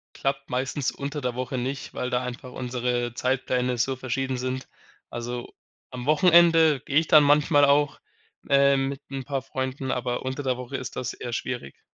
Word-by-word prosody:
klappt 135 Hz, 0 st, -2 dB
meistens 130 Hz, +2 st, -1 dB
unter 145 Hz, +1 st, -5 dB
der 125 Hz, -1 st, -2 dB
Woche 130 Hz, 0 st, -3 dB
nicht, 135 Hz, +3 st, -4 dB
weil 125 Hz, -, -3 dB
da 125 Hz, 0 st, 0 dB
einfach 125 Hz, 0 st, -7 dB
unsere 125 Hz, -1 st, -2 dB
Zeitpläne 125 Hz, -1 st, 0 dB
so 135 Hz, +3 st, 0 dB
verschieden 130 Hz, +1 st, -2 dB
sind. 130 Hz, +1 st, -3 dB, 0.4 s
Also, 120 Hz, +1 st, -5 dB, 0.4 s
am 125 Hz, +1 st, -6 dB
Wochenende 165 Hz, -2 st, +5 dB
gehe 140 Hz, -, 0 dB
ich 160 Hz, 0 st, +3 dB
dann 150 Hz, -1 st, +7 dB
manchmal 145 Hz, 0 st, +5 dB
auch, 145 Hz, 0 st, +2 dB, 0.5 s
äh, 140 Hz, 0 st, +5 dB
mit 135 Hz, +1 st, -2 dB
'n 135 Hz, -1 st, -5 dB
paar 135 Hz, -1 st, -2 dB
Freunden, 130 Hz, 0 st, -3 dB
aber 125 Hz, 0 st, -2 dB
unter 130 Hz, +2 st, -3 dB
der 130 Hz, -3 st, -1 dB
Woche 125 Hz, +2 st, -6 dB
ist 130 Hz, -1 st, -7 dB
das 125 Hz, -, -3 dB
eher 120 Hz, -, -6 dB
schwierig. 120 Hz, -, -5 dB
130 Hz, 175 wpm, -25 LUFS, 125-140 Hz, 0.5 s, dann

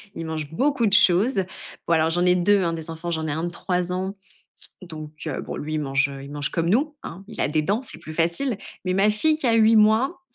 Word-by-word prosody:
Ils 165 Hz, -, -5 dB
mangent 155 Hz, -2 st, -5 dB
beaucoup 270 Hz, -, +1 dB
de 200 Hz, -, +1 dB
choses. 195 Hz, +3 st, +5 dB, 0.4 s
Bon, 170 Hz, -, +3 dB
alors 160 Hz, 0 st, +2 dB
j'en 175 Hz, +2 st, +1 dB
ai 180 Hz, 0 st, +5 dB
2, 195 Hz, +3 st, +3 dB
hein 170 Hz, -1 st, 0 dB
des 160 Hz, 0 st, -5 dB
enfants, 165 Hz, +2 st, -6 dB
j'en 160 Hz, -1 st, -2 dB
ai 150 Hz, -, -2 dB
un 160 Hz, +3 st, -2 dB
de -, -, -2 dB
3 180 Hz, +1 st, -2 dB
ans. 190 Hz, +2 st, -3 dB, 0.7 s
Donc 155 Hz, -4 st, -9 dB, 0.2 s
heu, -, -, -3 dB
bon -, -, -6 dB
lui 155 Hz, +1 st, -4 dB
il 155 Hz, -, 0 dB
mange 135 Hz, -1 st, +1 dB
il 140 Hz, -, -10 dB
mange 145 Hz, -1 st, -2 dB
comme 165 Hz, -1 st, -1 dB
nous, 295 Hz, -, +1 dB
hein, 185 Hz, +4 st, -8 dB
il 220 Hz, -, -8 dB
a -, -, +2 dB
des 155 Hz, +1 st, +1 dB
dents, 200 Hz, +10 st, 0 dB
c'est 165 Hz, -, -6 dB
plus 155 Hz, -2 st, -9 dB
facile. 170 Hz, -, 0 dB, 0.3 s
Mais 185 Hz, -, 0 dB
ma 195 Hz, +3 st, +4 dB
fille 305 Hz, +9 st, +2 dB
qui 275 Hz, -, -1 dB
a 230 Hz, -, +4 dB
8 225 Hz, 0 st, +5 dB
mois. 220 Hz, +11 st, +3 dB
180 Hz, 255 wpm, -23 LUFS, 160-215 Hz, 0.7 s, choses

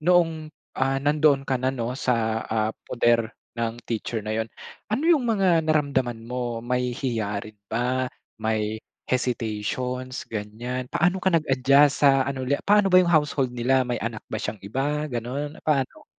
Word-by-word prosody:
noong, 165 Hz, -2 st, +2 dB, 0.3 s
ah, 135 Hz, +1 st, +1 dB
nandoon 145 Hz, -1 st, +3 dB
ka 135 Hz, -1 st, 0 dB
na 130 Hz, -, +1 dB
'no, 120 Hz, -1 st, -3 dB
sa, 115 Hz, -4 st, 0 dB
ah, 110 Hz, 0 st, 0 dB, 0.2 s
poder 120 Hz, -1 st, +2 dB, 0.3 s
ng 115 Hz, -1 st, -1 dB
teacher 115 Hz, -1 st, -3 dB
na 110 Hz, -, -2 dB
'yon. 110 Hz, 0 st, -1 dB, 0.4 s
Ano 220 Hz, +8 st, -1 dB
'yong 320 Hz, -7 st, +4 dB
mga 200 Hz, -4 st, +2 dB, 0.2 s
naramdaman 130 Hz, -7 st, 0 dB
mo? 120 Hz, -1 st, -3 dB
May 125 Hz, 0 st, 0 dB
hiya 110 Hz, -6 st, -2 dB
rin 110 Hz, -1 st, -12 dB
ba? 125 Hz, +3 st, 0 dB, 0.3 s
May 110 Hz, 0 st, -1 dB, 0.3 s
hesitations, 125 Hz, +1 st, -2 dB
ganiyan. 115 Hz, +4 st, -4 dB
Paano 180 Hz, +6 st, +1 dB
ka 190 Hz, -, +1 dB
nag-adjust 140 Hz, -1 st, +4 dB
sa 135 Hz, -1 st, +6 dB
ano 130 Hz, -2 st, -3 dB
ulit, 140 Hz, +2 st, 0 dB
paano 205 Hz, -1 st, +5 dB
ba 185 Hz, -, +5 dB
'yong 170 Hz, -, 0 dB
household 150 Hz, -5 st, +2 dB
nila? 130 Hz, +2 st, +2 dB
May 120 Hz, 0 st, -2 dB
anak 115 Hz, -1 st, -4 dB
ba 110 Hz, -, -2 dB
siyang 105 Hz, -2 st, -4 dB
iba, 145 Hz, +7 st, -1 dB
gano'n? 130 Hz, +6 st, -4 dB
Paano? 135 Hz, -4 st, 0 dB
130 Hz, 160 wpm, -25 LUFS, 115-145 Hz, 0.4 s, sa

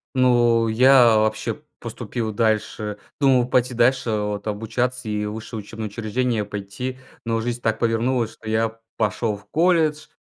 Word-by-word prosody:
Ну, 120 Hz, -2 st, +4 dB
я 120 Hz, 0 st, +6 dB
вообще 110 Hz, 0 st, -1 dB, 0.2 s
поступил 115 Hz, -3 st, -4 dB
дальше. 105 Hz, -1 st, -1 dB, 0.2 s
Думал 130 Hz, -4 st, +4 dB
пойти 125 Hz, 0 st, +1 dB
дальше 120 Hz, +1 st, +2 dB
вот 105 Hz, -1 st, -2 dB
обучаться 115 Hz, +3 st, -2 dB
и 105 Hz, 0 st, -1 dB
в 105 Hz, -, -4 dB
высшее 110 Hz, 0 st, -6 dB
учебное 110 Hz, +1 st, -6 dB
учреждение 115 Hz, +1 st, -1 dB
пойти, 105 Hz, +6 st, -5 dB, 0.3 s
но 115 Hz, 0 st, 0 dB
жизнь 120 Hz, +1 st, -3 dB
так 110 Hz, -1 st, 0 dB
повернулась, 115 Hz, 0 st, +1 dB
что 110 Hz, -, -9 dB
я 110 Hz, 0 st, 0 dB, 0.2 s
пошел 110 Hz, 0 st, 0 dB
в 100 Hz, -, -19 dB
колледж. 160 Hz, -2 st, +2 dB
115 Hz, 145 wpm, -22 LUFS, 110-125 Hz, 0.3 s, я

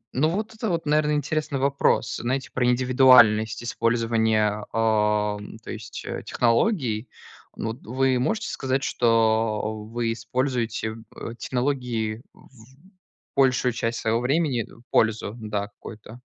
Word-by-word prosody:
Ну, 155 Hz, +5 st, +3 dB
вот 215 Hz, +5 st, -3 dB
это 220 Hz, -1 st, -3 dB
вот, 165 Hz, -2 st, -1 dB
наверно, 150 Hz, 0 st, +2 dB
интересный 150 Hz, -1 st, -1 dB
вопрос. 135 Hz, -5 st, +1 dB
Знаете, 130 Hz, +2 st, -2 dB
про 125 Hz, -1 st, +1 dB
индивидуальность 125 Hz, -3 st, +5 dB
использования, 110 Hz, -3 st, +1 dB
ам, 105 Hz, -1 st, 0 dB
то 110 Hz, -, -10 dB
есть, 110 Hz, -1 st, -8 dB
э, -, -, -4 dB
технологий. 120 Hz, -, +1 dB, 0.5 s
Ну, 115 Hz, -, -3 dB
вот 115 Hz, +4 st, -7 dB
вы 130 Hz, +2 st, +1 dB
можете 215 Hz, -, -1 dB
сказать, 135 Hz, +1 st, -1 dB
что 110 Hz, -2 st, +1 dB
вы 115 Hz, -1 st, -1 dB
используете 120 Hz, -1 st, -2 dB
в 110 Hz, 0 st, -11 dB, 0.3 s
э, -, -, -10 dB
технологии 125 Hz, -4 st, -2 dB
в -, -, -20 dB, 0.9 s
большую 130 Hz, -2 st, +3 dB
часть 115 Hz, 0 st, -2 dB
своего 115 Hz, +1 st, +1 dB
времени, 135 Hz, -1 st, +1 dB
э, 115 Hz, -, -17 dB
пользу, 110 Hz, -1 st, +1 dB
да, 105 Hz, -2 st, -3 dB
какую-то? 110 Hz, +3 st, -12 dB
115 Hz, 130 wpm, -24 LUFS, 110-130 Hz, 0.9 s, индивидуальность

